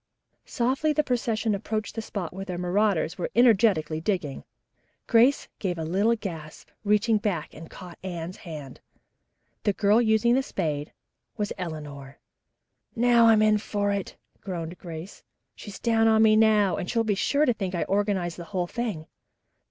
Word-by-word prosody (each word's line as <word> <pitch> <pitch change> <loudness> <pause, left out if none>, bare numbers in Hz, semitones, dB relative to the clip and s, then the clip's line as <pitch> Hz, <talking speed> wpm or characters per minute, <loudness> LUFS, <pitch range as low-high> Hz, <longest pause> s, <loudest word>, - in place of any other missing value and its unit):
Softly 265 +6 0
the 300 - +2
procession 230 -4 -1
approached 215 +2 -3
the 225 - -4
spot 195 -6 -5
where 195 +1 -6
the 180 -2 -5
marauders 180 -2 0
were - - -2
energetically 195 -10 +3
digging. 165 -8 -2 0.6
Grace 245 +4 +4
gave 180 -4 -2
a 160 - -3
little 200 +8 +2
gasp, 165 -8 -8
and 205 - -11
reaching 215 +2 +3
back 190 -7 -3 0.2
caught 180 -2 -11
Anne's 175 -1 -5
hand. 150 -6 -9 0.8
The 205 - +1
girl 210 +3 +3
using 220 +1 +3
the 265 - +3
spade 150 - -3 0.5
was 210 -1 -2
Eleanor. 145 -6 -7 0.8
"Now 235 0 +5
I'm 220 -1 +5
in 215 0 +4
for 205 -1 -1
it," 200 -2 -3 0.2
groaned 175 -2 -6
Grace. 170 +1 -9 0.3
"She's 205 -3 -9
down 225 -1 +2
on 220 0 +5
me 215 -1 +6
now, 215 -3 +4
and 180 - -4
she'll 230 -1 +1
be 215 -2 +1
sure 280 +9 +1
to 245 - +2
think 190 -4 -4
I 170 - 0
organized 195 -4 -1
the 170 - -7
whole 185 -1 -2
thing." 205 -5 -4
205 Hz, 160 wpm, -26 LUFS, 175-225 Hz, 0.8 s, me